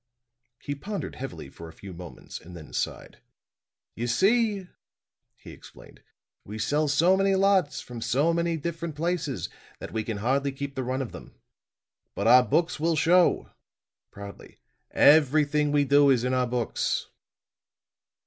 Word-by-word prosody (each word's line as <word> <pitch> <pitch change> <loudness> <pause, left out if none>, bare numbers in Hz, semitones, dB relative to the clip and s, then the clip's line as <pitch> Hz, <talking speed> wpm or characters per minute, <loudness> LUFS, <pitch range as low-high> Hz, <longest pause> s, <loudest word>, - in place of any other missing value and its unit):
He 145 - -5
pondered 200 +8 -6
heavily 120 - -7
for 85 +4 -11
a - - -14
few 95 +2 -11
moments 90 -1 -10
and 90 +1 -12
then 80 - -12
sighed. - - -4 0.7
"You 120 +2 -4
see," 200 - +2 0.7
he - - -13
explained, - - -15 0.4
"we 105 +2 -8
sell 145 +8 0
so 165 +7 +3
many 195 0 +2
lots, 190 -5 +2
from 120 -2 -9
so 145 +9 +1
many 170 0 0
different 165 0 -5
places, 160 -4 -2 0.3
that - - -9
we 110 -1 -1
can 110 -1 -4
hardly 135 +6 0
keep 140 +1 -6
the 130 - -3
run 130 +2 -2
of 120 - -8
them. - - -12 0.8
But - - -3
our 125 - +8
books 165 +6 0
will 165 +1 +1
show," 175 +3 +3 0.6
proudly; 100 0 -11 0.3
"everything 150 0 +4
we 145 -1 +2
do 140 +1 +5
is 125 -3 +3
in 125 0 0
our 125 -1 +1
books." 120 -1 -2
145 Hz, 150 wpm, -26 LUFS, 125-170 Hz, 0.8 s, our